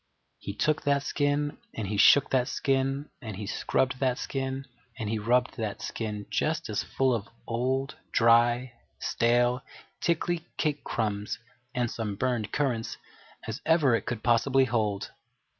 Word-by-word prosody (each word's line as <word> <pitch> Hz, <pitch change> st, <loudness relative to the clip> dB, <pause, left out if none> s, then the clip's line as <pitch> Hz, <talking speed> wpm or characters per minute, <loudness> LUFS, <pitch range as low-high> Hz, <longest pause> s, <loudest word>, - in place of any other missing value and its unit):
He 100 Hz, -, -6 dB
took 155 Hz, +7 st, +1 dB
that 140 Hz, -1 st, +2 dB
skin, 145 Hz, 0 st, 0 dB, 0.2 s
and 110 Hz, -3 st, -3 dB
he 105 Hz, -, -2 dB
shook 140 Hz, +6 st, +6 dB
that 125 Hz, -2 st, +3 dB
skin, 135 Hz, +1 st, 0 dB
and 110 Hz, -5 st, -6 dB
he 105 Hz, +2 st, -5 dB
scrubbed 130 Hz, +5 st, 0 dB
that 130 Hz, -2 st, +1 dB
skin, 135 Hz, 0 st, -3 dB, 0.3 s
and 110 Hz, -, -3 dB
he 110 Hz, +1 st, -1 dB
rubbed 125 Hz, +4 st, +2 dB
that 110 Hz, -3 st, -3 dB
skin 105 Hz, -2 st, -4 dB
just 155 Hz, -5 st, 0 dB
as 105 Hz, -, 0 dB
full 130 Hz, -1 st, +1 dB
of 110 Hz, -3 st, -2 dB, 0.2 s
old, 130 Hz, +4 st, -1 dB
dry, 120 Hz, +2 st, +4 dB, 0.2 s
stale, 120 Hz, +1 st, +2 dB, 0.4 s
tickly 170 Hz, 0 st, 0 dB
cake 150 Hz, -2 st, 0 dB
crumbs 105 Hz, -2 st, -2 dB, 0.4 s
and 120 Hz, -2 st, 0 dB
some 105 Hz, -3 st, -3 dB
burned 120 Hz, -1 st, -1 dB
currants 125 Hz, -6 st, -1 dB, 0.5 s
as -, -, -4 dB
ever 160 Hz, -6 st, +4 dB
it 115 Hz, -, 0 dB
could 120 Hz, -5 st, -3 dB
possibly 130 Hz, +3 st, +4 dB
hold. 110 Hz, -5 st, -1 dB
125 Hz, 150 wpm, -28 LUFS, 110-135 Hz, 0.5 s, shook